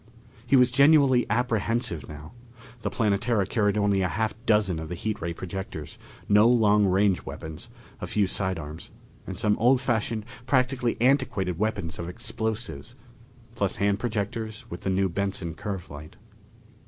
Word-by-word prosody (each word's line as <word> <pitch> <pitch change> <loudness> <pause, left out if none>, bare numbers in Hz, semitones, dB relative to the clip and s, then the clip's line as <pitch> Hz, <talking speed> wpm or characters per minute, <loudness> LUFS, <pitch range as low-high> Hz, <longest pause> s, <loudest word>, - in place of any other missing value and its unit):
He 130 - +4
was 125 -1 +5
genuinely 140 -2 +5
apprehensive 115 -5 0
now. 75 +1 -10 0.5
The - - -1
Planetara 105 -1 +1
carried 105 0 +1
only 100 -2 +2
a 90 - +2
half 110 +2 -1
dozen 105 -6 +2
of 80 -1 -6
the 90 - -4
heat 105 +4 -3
ray 85 +1 -2
projectors, 85 -3 -6 0.3
no 105 +2 +6
long 105 -4 +4
range 95 0 +2
weapons, 80 -1 -8 0.3
a - - -5
few 105 -1 +1
side 95 -1 0
arms, 75 0 -8 0.4
and 95 - -5
some 105 +1 +2
old 125 +3 +4
fashioned, 115 -3 -1 0.2
practically 125 -2 +1
antiquated 115 - +1
weapons 105 -7 -2
of 85 0 -4
explosives, 110 - -4 0.6
plus - - -1
hand 100 +1 +1
projectors 110 -1 -3
with 85 - -6
the - - -2
new 95 +1 +2
Benson 95 -2 -2
curve 95 +1 -5
light. 75 +4 -10
105 Hz, 155 wpm, -26 LUFS, 90-115 Hz, 0.6 s, no